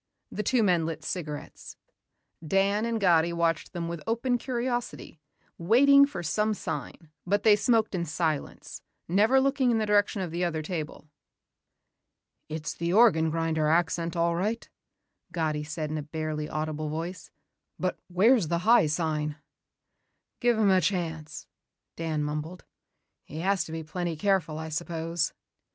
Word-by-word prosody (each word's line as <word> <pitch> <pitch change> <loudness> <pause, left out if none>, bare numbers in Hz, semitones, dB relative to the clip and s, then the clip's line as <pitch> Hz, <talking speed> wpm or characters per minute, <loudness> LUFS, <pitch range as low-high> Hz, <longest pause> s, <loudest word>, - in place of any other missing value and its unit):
The - - -3
two 235 +3 +2
men 175 -5 +2
lit 165 - -5
cigarettes. 150 -5 -6 0.7
Dan 195 +6 +1
and 230 -1 -1
Gatti 170 -4 +3
watched 170 -1 0
them 170 -1 -4
with 170 -2 -5
open 240 +2 0
curiosity, 240 - -4 0.4
waiting 280 +10 +6
for 180 -11 -6
some 210 +6 0
sign 165 -4 -6 0.2
but 205 +2 +1
they 215 -2 +7
smoked 220 0 +2
in 175 -2 -1
silence, 155 -2 -3 0.3
never 215 +9 +4
looking 270 -1 +2
in 235 - +2
the 220 - 0
direction 205 -1 +2
of 175 - -5
the 175 +2 -2
other 160 -3 -1
table. 155 -2 -5 1.4
"It's 155 0 -4
the 170 0 -2
organ 190 -7 +5
grinder 160 -1 0
accent 165 +1 +1
all 170 0 +1
right," 215 +6 -2 0.6
Gatti 155 -3 -1
said 150 0 -4
in 155 - -2
a - - -3
barely 155 0 -4
audible 155 0 -3
voice. 165 +3 -5 0.5
"But 185 0 -2
where's 195 +2 +4
the 170 +2 -2
high 230 -7 +6
sign?" 150 -1 -1 1.0
"Give 240 -2 +2
him 210 -3 +4
a 185 -1 +4
chance," 160 -4 -3 0.5
Dan 160 -2 -2
mumbled. 150 +4 -5 0.6
"He 155 +3 -7
has 195 +1 +1
to - - -9
be 160 0 -4
plenty 170 +1 -3
careful, 175 -3 0
I 160 0 -5
suppose." 165 0 -2
170 Hz, 150 wpm, -27 LUFS, 160-205 Hz, 1.4 s, they